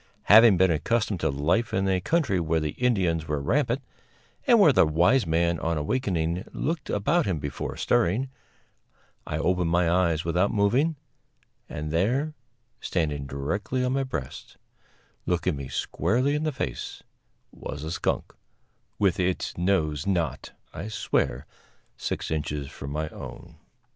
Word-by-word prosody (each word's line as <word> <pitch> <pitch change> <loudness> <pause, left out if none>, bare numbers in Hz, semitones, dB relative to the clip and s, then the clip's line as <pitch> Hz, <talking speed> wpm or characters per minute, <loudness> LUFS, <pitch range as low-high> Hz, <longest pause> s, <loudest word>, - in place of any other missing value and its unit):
Having 110 -1 +7
been 95 0 +4
accustomed 105 +4 0
to 80 - +1
life 75 +12 0
in 95 +1 +1
a 95 -1 +1
country 140 - +1
where 80 -1 +1
the 75 -1 -2
Indians 90 -10 0
were 75 -1 -1
rampant, 125 - 0 0.6
and 240 -3 +6
where 160 -8 +7
the - - +6
wise 90 +9 +3
man 85 +1 +1
on 85 0 -1
awakening 85 - -1
looked 160 -1 -3
about 150 - +1
him 90 -4 0
before 70 -2 -5
stirring, 110 +11 +1 1.0
I 75 - -2
opened 90 +1 +1
my 85 0 +2
eyes 85 -2 +2
without 90 +4 +2
moving, 125 +11 +2 0.7
and 75 +1 -5
there, 125 - +1 0.5
standing 75 -5 -2
directly 100 - -2
on 125 - 0
my 135 - +1
breast, 80 - -6 0.7
looking 90 -1 0
me 70 -1 -6
squarely 130 - 0
in 150 +1 -1
the 155 - +1
face, 70 - -5 0.5
was 75 0 -7
a 80 - -4
skunk, - - -2 0.6
with 95 -4 +2
its 90 0 -1
nose 85 -3 0
not, 90 -5 -1 0.2
I 100 - -6
swear, 75 - -1 0.5
six - - -4
inches 75 -2 -3
from 70 - -7
my 75 +2 -2
own. 85 0 -10
90 Hz, 145 wpm, -26 LUFS, 80-115 Hz, 1.0 s, Having